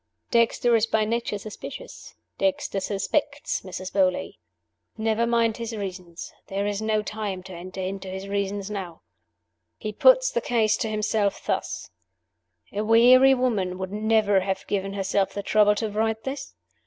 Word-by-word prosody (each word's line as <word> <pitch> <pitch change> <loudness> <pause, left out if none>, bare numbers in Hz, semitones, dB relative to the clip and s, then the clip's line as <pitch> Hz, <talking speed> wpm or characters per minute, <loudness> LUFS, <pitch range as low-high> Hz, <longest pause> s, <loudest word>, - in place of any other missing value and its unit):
Dexter 235 0 +3
is 225 0 +3
by 220 -1 +2
nature 230 -1 -1
suspicious. 215 - -9 0.2
Dexter 290 -8 0
suspects 210 +10 -1
Mrs. 185 0 -7
Beauly. 185 -2 +1 0.6
Never 225 +1 +1
mind 230 -2 +2
his 230 -1 -4
reasons; 180 -4 -7
there 195 +1 -2
is 205 0 -2
no 215 -1 +1
time 205 -3 -4
to 190 0 -10
enter 185 +2 -7
into 195 +1 -4
his 190 +1 -6
reasons 200 0 -2
now. 185 -5 -6 0.7
He 215 - -5
puts - - +5
the 485 - 0
ease 215 -2 +4
to 225 - -2
himself 215 -1 0
thus: - - -3 0.8
'A 205 - -1
weary 250 +4 +7
woman 210 -8 0
would 190 0 -5
never 210 -1 +3
have 190 0 -3
given 195 -1 -2
herself 195 0 0
the 200 - -3
trouble 210 0 +4
to 215 0 -2
write 220 +1 -1
this. 270 +1 -6
210 Hz, 155 wpm, -25 LUFS, 195-225 Hz, 0.8 s, weary